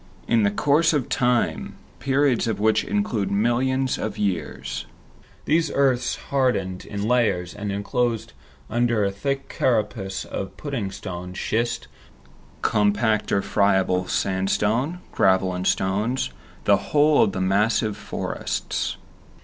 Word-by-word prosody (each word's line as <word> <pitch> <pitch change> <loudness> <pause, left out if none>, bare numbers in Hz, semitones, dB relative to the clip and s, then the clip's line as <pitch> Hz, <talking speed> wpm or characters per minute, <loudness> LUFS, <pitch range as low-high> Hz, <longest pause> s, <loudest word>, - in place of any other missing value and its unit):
In 110 -3 +3
course 150 +3 +3
of 145 -5 0
time, 125 -2 0 0.2
periods 135 -3 +2
of 110 -3 -1
which 110 +1 +3
include 165 - -1
millions 125 +5 +1
of 105 -1 -3
years, 80 -10 -3 0.6
these 160 0 +2
earths 130 -3 +2 0.2
hardened 125 -9 0
in 100 0 -4
layers, 110 -8 +1
and 105 -1 -4
enclosed 115 - -1 0.3
under 120 -2 +1
a 100 - 0
thick 135 +7 -3
carapace 105 -5 -1
of 95 - -6
pudding 130 -9 -3
stone, 90 -2 -7
schist, 115 +5 -1 0.8
compact 105 +1 +2
or 100 - +2
friable 95 -3 +2
sandstone, 105 - 0
gravel 95 -1 +3
and 90 +1 -2
stones, 105 +7 0 0.3
the 100 - +5
whole 145 +8 +3
of 100 - +3
the 95 - -3
massive 105 +3 +2
forests. 105 - -3
110 Hz, 120 wpm, -24 LUFS, 95-125 Hz, 0.8 s, the